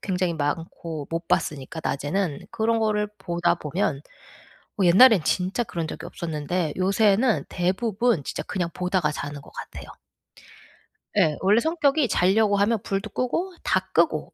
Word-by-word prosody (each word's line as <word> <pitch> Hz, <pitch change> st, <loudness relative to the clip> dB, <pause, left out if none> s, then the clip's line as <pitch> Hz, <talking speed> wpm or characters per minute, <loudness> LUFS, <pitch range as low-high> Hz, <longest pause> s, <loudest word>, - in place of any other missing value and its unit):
굉장히 180 Hz, -3 st, -1 dB
많고 160 Hz, 0 st, -4 dB
못 165 Hz, 0 st, -3 dB
봤으니까 150 Hz, +2 st, -1 dB
낮에는. 145 Hz, +3 st, -2 dB
그런 230 Hz, 0 st, +1 dB
거를 210 Hz, -1 st, 0 dB
보다 170 Hz, 0 st, 0 dB
보면 150 Hz, -2 st, -2 dB, 0.8 s
어 -, -, +4 dB
옛날엔 195 Hz, 0 st, +7 dB
진짜 185 Hz, +6 st, 0 dB
그런 170 Hz, -7 st, -4 dB
적이 160 Hz, -, -7 dB
없었는데 160 Hz, 0 st, -3 dB
요새는 205 Hz, +5 st, +2 dB
대부분 195 Hz, -, 0 dB
진짜 -, -, -4 dB
그냥 180 Hz, -4 st, -3 dB
보다가 180 Hz, -4 st, 0 dB
자는 145 Hz, -1 st, -6 dB
것 -, -, -16 dB
같아요. -, -, -9 dB, 1.3 s
예. 160 Hz, -7 st, +3 dB
원래 205 Hz, +4 st, +4 dB
성격이 300 Hz, -3 st, +2 dB
자려고 205 Hz, +3 st, +3 dB
하면 210 Hz, +1 st, +2 dB
불도 195 Hz, +2 st, -3 dB
끄고 335 Hz, -, -2 dB
다 -, -, 0 dB
끄고 -, -, +1 dB
185 Hz, 300 characters per minute, -24 LUFS, 165-220 Hz, 1.3 s, 옛날엔